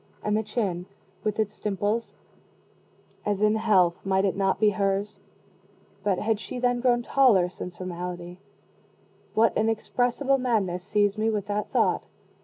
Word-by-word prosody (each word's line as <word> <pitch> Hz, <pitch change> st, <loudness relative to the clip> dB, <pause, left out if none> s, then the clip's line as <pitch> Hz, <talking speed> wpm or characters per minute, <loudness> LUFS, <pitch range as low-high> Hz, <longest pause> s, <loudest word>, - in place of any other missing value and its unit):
And 210 Hz, 0 st, +1 dB
the 215 Hz, -, +2 dB
chin, 200 Hz, -5 st, -2 dB, 0.4 s
with 210 Hz, -1 st, -1 dB
its 215 Hz, -1 st, -2 dB
dimples, 210 Hz, +3 st, -2 dB, 1.1 s
as 205 Hz, 0 st, -1 dB
in 210 Hz, 0 st, +4 dB
health, 195 Hz, -6 st, +2 dB
might 190 Hz, 0 st, +2 dB
it 195 Hz, -, 0 dB
not 195 Hz, -1 st, +1 dB
be 210 Hz, -1 st, +4 dB
hers? 200 Hz, +1 st, -1 dB, 0.8 s
but 200 Hz, -3 st, +1 dB
had 215 Hz, +1 st, 0 dB
she 250 Hz, -, -7 dB
then 245 Hz, 0 st, +1 dB
grown 240 Hz, -1 st, +2 dB
taller 230 Hz, -10 st, +4 dB
since 180 Hz, 0 st, -8 dB
her 185 Hz, -, -7 dB
malady? 175 Hz, 0 st, -6 dB, 1.0 s
What 225 Hz, +1 st, +4 dB
inexpressible 240 Hz, +5 st, +1 dB
madness 210 Hz, -8 st, 0 dB
seized 205 Hz, +1 st, +1 dB
me 220 Hz, +1 st, +2 dB
with 210 Hz, -3 st, -1 dB
that 210 Hz, 0 st, -2 dB
thought? -, -, +2 dB
210 Hz, 150 wpm, -26 LUFS, 190-225 Hz, 1.1 s, in